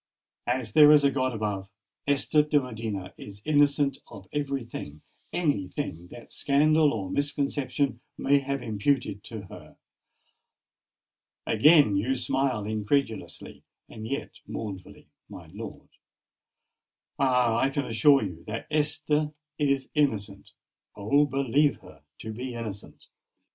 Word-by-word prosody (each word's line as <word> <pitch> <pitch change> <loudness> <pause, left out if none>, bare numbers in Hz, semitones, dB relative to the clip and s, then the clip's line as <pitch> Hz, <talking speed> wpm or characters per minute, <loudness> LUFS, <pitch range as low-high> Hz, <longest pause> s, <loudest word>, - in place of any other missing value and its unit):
As 120 -3 -1
there 150 -1 +8
is 150 -1 +6
a 140 - +4
God 130 -2 0
above, 105 -4 -3 0.4
Esther 145 +2 +3
de 150 0 +2
Medina 110 -7 -5
is 100 0 -10
innocent 145 -2 +3
of 100 -4 -12
every 140 -3 -2
thing—any 100 - -4
thing 90 - -5
that 120 +6 -12
scandal 150 +2 +3
or 100 -4 -4
misconception 140 -2 -1 0.2
may 140 +1 +3
have 140 -1 -3
imputed 110 -1 -1
to 110 -3 -6
her. 95 - -13 1.7
Again 145 -1 +5
you 125 +7 0
smile 130 -3 0
incredulously—and 110 -1 -4
yet 140 +4 -5
mournfully, 95 -4 -7 0.2
my - - -11
lord! - - -9 1.3
Ah! 125 -4 +3
I 135 - +2
can 140 0 -2
assure 135 +5 +4
you, 90 -5 -6
that 110 +2 -4
Esther 150 0 0 0.3
is 140 -2 0
innocent—oh! 110 0 -1
believe 140 +1 +2
her - - -16 0.2
to 110 - -6
be 125 +2 -6
innocent!" 110 -4 -8
130 Hz, 115 wpm, -27 LUFS, 110-145 Hz, 1.7 s, there